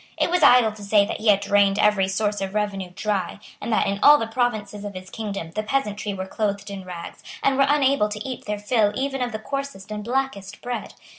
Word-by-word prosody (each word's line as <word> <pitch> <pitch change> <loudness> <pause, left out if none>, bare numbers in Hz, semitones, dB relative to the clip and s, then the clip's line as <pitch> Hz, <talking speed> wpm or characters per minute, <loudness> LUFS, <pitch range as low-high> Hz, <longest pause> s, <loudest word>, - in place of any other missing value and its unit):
It - - +1
was 360 -1 +2
idle 250 -6 +6
to 210 0 -12
say 200 0 +4
that - - -4
he 220 - -4
had 200 -1 +5
drained 200 -1 +3
every 205 -2 +3
source 205 +1 -1
of 195 +1 -4
revenue 200 -3 -2
dry, 200 -2 -2 0.2
and - - -4
that, 220 - +2
in 200 0 -1
all 295 +1 +8
the 225 - -2
provinces 220 -3 -2
of 205 -2 -6
his 185 0 -9
kingdom, 200 -7 -5
the 215 - -2
peasantry 215 -3 -2
were 190 -1 -4
clothed 200 0 -3
in 195 -1 -6
rags, 175 -2 -8 0.2
and 275 - +3
were 275 0 +4
unable 275 -6 +3
to 210 +3 -5
eat 255 - -6
their 210 0 -2
fill 205 0 +2
even 270 0 -2
of 245 -1 -1
the 215 - -3
coarsest 275 -4 -6
and 210 0 -4
blackest 240 -5 -3
bread. 245 0 -5
210 Hz, 230 wpm, -23 LUFS, 200-245 Hz, 0.2 s, all